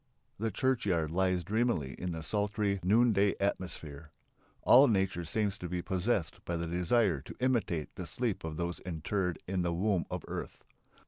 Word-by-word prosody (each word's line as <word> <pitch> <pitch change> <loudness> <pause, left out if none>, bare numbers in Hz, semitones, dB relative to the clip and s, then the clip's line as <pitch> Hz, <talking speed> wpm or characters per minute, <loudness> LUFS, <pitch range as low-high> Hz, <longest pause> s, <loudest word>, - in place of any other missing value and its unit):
The 115 +1 0
churchyard 100 - 0
lies 90 0 +1
dreamily 100 - 0
in 90 +7 -4
the 80 -1 -5
sultry 105 0 0
noonday 105 +1 +4
atmosphere. 80 -6 -3 0.5
All 135 +3 +8
nature 95 -5 +1
seems 100 +4 -1
to 90 - -5
be 90 0 -2
possessed 95 -2 -1
by 85 - -2
the 85 - -2
desire 90 - +2
to - - -10
imitate 115 - 0
the 90 -2 -6
sleep 110 +6 -2
of 80 -1 -5
those 85 +1 -3
interred 90 +1 -2
in 95 0 0
the 85 -1 0
womb 95 0 +1
of - - -4
earth. - - -6
95 Hz, 165 wpm, -32 LUFS, 85-105 Hz, 0.5 s, All